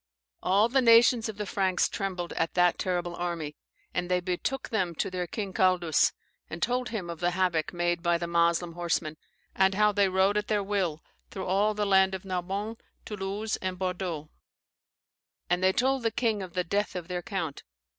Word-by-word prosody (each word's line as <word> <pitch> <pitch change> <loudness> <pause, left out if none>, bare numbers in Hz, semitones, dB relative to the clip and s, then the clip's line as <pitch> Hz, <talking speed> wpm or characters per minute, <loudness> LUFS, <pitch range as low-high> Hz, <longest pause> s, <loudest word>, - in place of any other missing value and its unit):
All 200 +4 +3
the 265 +3 +2
nations 230 -1 +5
of 215 - -7
the 210 - -3
Franks 190 -2 +1
trembled 185 -4 -4
at 165 - -1
that 175 -1 +3
terrible 175 -1 -1
army, 170 -4 -3 0.4
and 180 0 -2
they 180 0 +2
betook 185 +9 -3
them 185 -6 -1
to 185 - -2
their 180 -1 -3
king 200 -2 -4
Caldus, 180 -4 +3 0.4
and 160 - -6
told 250 +4 0
him 215 -6 -4
of 170 -2 -6
the 175 0 +2
havoc 175 -4 +1
made 175 -1 0
by 170 0 +2
the 170 - -3
Moslem 170 0 +1
horsemen, 170 -2 -1 0.4
and 190 0 +3
how 210 +1 +4
they 200 -1 +2
rode 190 +2 +2
at 210 0 -1
their 210 -2 +1
will 190 -6 -1 0.3
through 190 - -6
all 205 +3 +2
the 210 0 0
land 190 -1 +4
of 190 - -8
Narbonne 195 +4 -3 0.3
Toulouse, 210 +1 -3
and 185 -1 -4
Bordeaux, 180 -4 -3 1.2
and 180 +1 +2
they 190 - +5
told 265 +5 +1
the 230 - +1
king 225 -3 0
of 185 -3 -7
the 180 - 0
death 200 +4 -1
of 175 -2 -5
their 180 -1 -3
count. 175 -8 -4
185 Hz, 190 wpm, -28 LUFS, 175-205 Hz, 1.2 s, nations